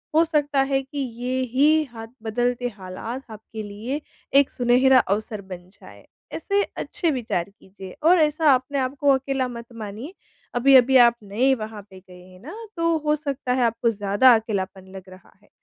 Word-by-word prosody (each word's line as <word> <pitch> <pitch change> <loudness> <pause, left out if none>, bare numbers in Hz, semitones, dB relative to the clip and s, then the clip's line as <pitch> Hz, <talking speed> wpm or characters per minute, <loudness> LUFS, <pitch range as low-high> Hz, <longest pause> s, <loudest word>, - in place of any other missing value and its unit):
हो 325 - +6
सकता 290 -3 +1
है 270 0 0
कि 270 +2 -11
ये 250 0 -3
ही 305 +4 +4
हाथ 225 0 -8 0.2
बदलते 245 +2 -1
हालात 215 +8 -7
आपके 220 0 -9
लिए 220 +8 -5 0.4
एक 280 - +2
सुनहरा 255 +2 +4
अवसर 215 0 -2
बन 180 0 -8
जाएँ। - - -16 0.3
ऐसे 400 +4 0 0.2
अच्छे 340 - -2
विचार 230 -9 -2 0.2
कीजिए 190 -1 -12
और 345 +2 +5
ऐसा 305 -1 +3
अपने 260 +2 -1
आपको 275 +2 -1
अकेला 265 -1 -1
मत 235 -1 -8
मानिए। 225 - -8 0.4
अभी-अभी 265 +1 +5
आप 235 -1 +6
नए 240 +7 +1
वहाँ 215 -2 -7
पे 190 0 -13
गए 180 -1 -16
हैं 185 0 -17
न 325 - -8 0.2
तो 335 -1 +1
हो 300 - +3
सकता 280 -4 -3
है 255 - +1
आपको 230 0 +1
ज़्यादा 205 +4 +4
अकेलापन 195 -4 -4
लग 190 - -8
रहा 185 -1 -16
है। 205 - -27
245 Hz, 175 wpm, -23 LUFS, 210-275 Hz, 0.4 s, हो